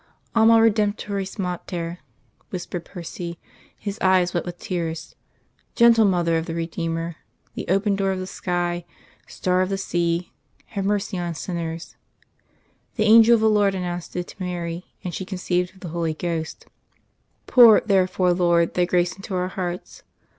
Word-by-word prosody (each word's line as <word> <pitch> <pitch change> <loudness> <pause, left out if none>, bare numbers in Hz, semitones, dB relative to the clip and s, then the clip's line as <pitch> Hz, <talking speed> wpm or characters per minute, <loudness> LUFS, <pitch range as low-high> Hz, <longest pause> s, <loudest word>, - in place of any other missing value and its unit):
"Alma 225 0 +6
Redemptoris 205 -3 0
Mater," 175 -2 -4 0.5
whispered 175 -2 -5
Percy, 170 -1 -7 0.4
his 205 +1 -5
eyes 185 -1 +3
wet 175 - -1
with 175 0 -6
tears. 165 -3 -4 0.6
"Gentle 235 -2 +6
Mother 170 -4 +2
of 160 - -6
the 165 - -4
Redeemer 165 0 -3 0.4
the - - -6
open 195 +3 +2
door 195 0 0
of 190 - -2
the 185 - -4
sky, 175 -2 -2 0.4
star 185 0 0
of 185 - 0
the 195 - -1
sea 175 -2 -1 0.4
have 200 -3 -2
mercy 200 -2 -1
on 175 -1 -3
sinners. 165 -1 -5 1.0
The 215 - +1
Angel 225 +2 +7
of 225 - 0
the 220 - +4
Lord 205 -2 +3
announced 175 -2 -4
it 180 0 -2
to - - -13
Mary, 175 -1 -4 0.2
and 180 - -4
she 190 - -4
conceived 180 -1 -2
of - - -18
the 175 - -6
Holy 165 -1 -2
Ghost.... 165 -1 -4 0.8
_Pour, 235 -4 +7
therefore, 185 -3 +2
Lord, 170 -1 +2
Thy 180 - +2
grace 175 0 +1
into 195 0 -6
our 180 0 -1
hearts. 180 -1 -5
180 Hz, 155 wpm, -23 LUFS, 170-195 Hz, 1.0 s, Angel